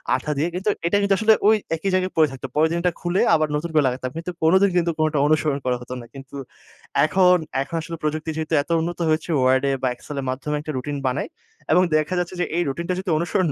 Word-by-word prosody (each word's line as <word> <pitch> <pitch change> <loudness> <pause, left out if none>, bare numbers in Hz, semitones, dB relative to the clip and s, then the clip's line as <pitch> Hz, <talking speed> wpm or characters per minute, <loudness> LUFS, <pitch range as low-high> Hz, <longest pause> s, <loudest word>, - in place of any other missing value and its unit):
আঠা 150 - -3
দিয়ে 155 +4 +1
কিন্তু 190 +3 -1 0.2
এটা 205 - +2
কিন্তু 200 0 +2
আসলে 220 0 +5
ওই 220 - +6 0.2
একই 180 +5 -2
জায়গায় 185 0 +1
পড়ে 155 - +5
থাকত। 135 - -11
পরের 155 +1 +4
দিন 170 - 0
ওটা 180 0 +2
খুলে 175 +2 0
আবার 155 -1 +1
নতুন 170 +3 -2
করে 150 -2 +4
লাগাতাম 130 0 -2
কিন্তু 170 +2 -4
কোনোদিন 190 +4 +5
কিন্তু 170 -1 +2
কোনোটা 155 -1 +1
অনুসরণ 150 -2 +1
করা 125 -1 +1
হত 125 - -11
না 120 - -11
কিন্তু 135 0 -11 0.7
এখন 180 +2 +4 0.3
এখন 165 - -5
আসলে 165 +1 -7
প্রযুক্তি 155 +1 -2
যেহেতু 160 0 -3
এত 160 - -31
উন্নত 175 +1 -4
হয়েছে 155 +2 0
ওয়ার্ডে 130 +2 +3
বা 130 - +1
এক্সেলের 140 +1 -6
মাধ্যমে 145 +3 -3
একটা 155 - -5
রুটিন 145 +3 -4
বানাই 130 +3 -1 0.4
এবং 180 +3 +5
দেখা 155 +4 +1
যাচ্ছে 180 +1 -3
যে - - +2
এই 175 - +2
রুটিনটা 170 +6 -2
যদি 190 -1 -5
অনুসরণ 175 +2 0
155 Hz, 225 wpm, -22 LUFS, 145-180 Hz, 0.7 s, ওই